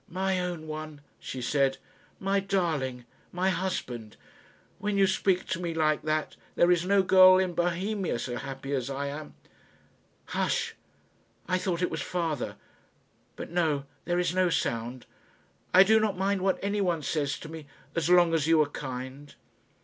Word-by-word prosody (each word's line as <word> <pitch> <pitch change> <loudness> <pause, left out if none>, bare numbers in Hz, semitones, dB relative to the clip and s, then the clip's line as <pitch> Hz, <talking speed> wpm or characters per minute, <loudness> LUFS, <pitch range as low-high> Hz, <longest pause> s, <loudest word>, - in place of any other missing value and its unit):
"My 190 +1 0
own 175 -3 -3
one," 155 -1 -7 0.2
she 130 -2 -6
said, 135 +1 +1 0.4
"my 195 +1 +1
darling, 160 -11 -1 0.3
my 185 +2 +1
husband; 125 - -4 0.6
when 205 0 -1
you 195 - +5
speak 190 -1 +1
to 185 - -1
me 170 -2 -3
like 155 -1 +2
that, 155 0 -1 0.2
there 175 - +4
is 175 -1 +3
no 200 0 +4
girl 185 0 +8
in 185 -1 +1
Bohemia 180 - -1
so 120 +1 -4
happy 135 +1 -5
as 130 -1 -1
I 140 +1 -3
am. 150 +1 -8 0.9
Hush! - - -1 0.7
I 185 +1 +1
thought 180 -1 -1
it - - 0
was - - -3
father. 165 -6 -2 0.8
But - - -7
no; 155 -5 +1 0.2
there 175 0 0
is 175 -1 +1
no 185 -1 +3
sound. 120 -4 -2 0.7
I 185 - +8
do 220 +3 +5
not 210 -3 0
mind 195 0 0
what 190 0 +2
anyone 195 -6 0
says 145 -2 -1
to - - -9
me, 155 -2 -9 0.3
as 170 0 0
long 175 -2 +5
as 160 -2 +1
you 165 -1 +5
are 145 - -5
kind." 130 +1 -7
170 Hz, 165 wpm, -28 LUFS, 145-185 Hz, 0.9 s, girl